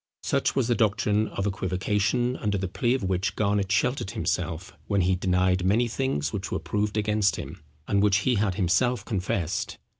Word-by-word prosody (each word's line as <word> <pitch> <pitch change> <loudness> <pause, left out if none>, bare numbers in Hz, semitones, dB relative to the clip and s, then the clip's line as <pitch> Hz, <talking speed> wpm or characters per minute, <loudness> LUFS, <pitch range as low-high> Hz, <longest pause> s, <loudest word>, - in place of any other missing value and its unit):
Such - - 0
was - - +1
the 120 - +3
doctrine 110 -1 +1
of 100 - -4
equivocation, 105 +6 0
under 105 -2 -1
the 95 0 -2
plea 120 +7 0
of 130 - -3
which 95 -1 -1
Garnet 100 -2 0
sheltered 125 0 +1
himself 85 -1 -3
when 100 -2 +2
he 90 +1 +2
denied 90 0 +1
many 110 +6 +3
things 115 - -2
which 100 -1 -4
were - - 0
proved 105 +6 -2
against 105 -1 +2
him, - - -8 0.3
and 100 -1 +2
which 100 -1 +4
he 125 - +2
had 100 -4 +1
himself 100 +5 +1
confessed. 95 -5 -2
100 Hz, 180 wpm, -26 LUFS, 95-110 Hz, 0.3 s, which